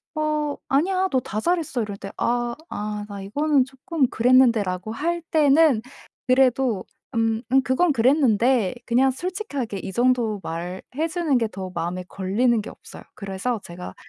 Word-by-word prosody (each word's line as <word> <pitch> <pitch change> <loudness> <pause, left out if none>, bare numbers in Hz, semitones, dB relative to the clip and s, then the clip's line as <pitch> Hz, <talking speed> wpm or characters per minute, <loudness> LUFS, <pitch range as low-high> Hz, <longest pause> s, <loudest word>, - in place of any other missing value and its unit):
"어 305 -1 -1
아니야. 370 +7 +2
너 260 - +2
다 215 -3 -4
잘했어." 320 -4 0
이럴 205 -2 -5
때 195 0 -8
"아 240 0 0
아 210 0 -4
나 200 -1 -7
이거는 285 +7 +2
쪼끔 270 +3 -1
그랬는데."라고 225 -6 +3
할 340 +8 -2
때는 300 -5 +4 0.5
그래도 255 -4 +2 0.3
"음 225 0 +1
음 265 +1 +4
그건 300 +7 +2
그랬는데." 245 -4 +3
그냥 255 +3 +3
솔직하게 285 - -4
이 190 - -6
정도 240 -3 +1
말해 175 +3 -5 0.3
주는 320 -6 +1
게 225 -2 0
더 190 -2 -6
마음에 180 +2 -3
걸리는 215 +5 +1
게 210 - -7
없어요. - - -13
그래서 200 +4 -3
제가 175 +1 -8
245 Hz, 300 characters per minute, -23 LUFS, 210-285 Hz, 0.5 s, 때는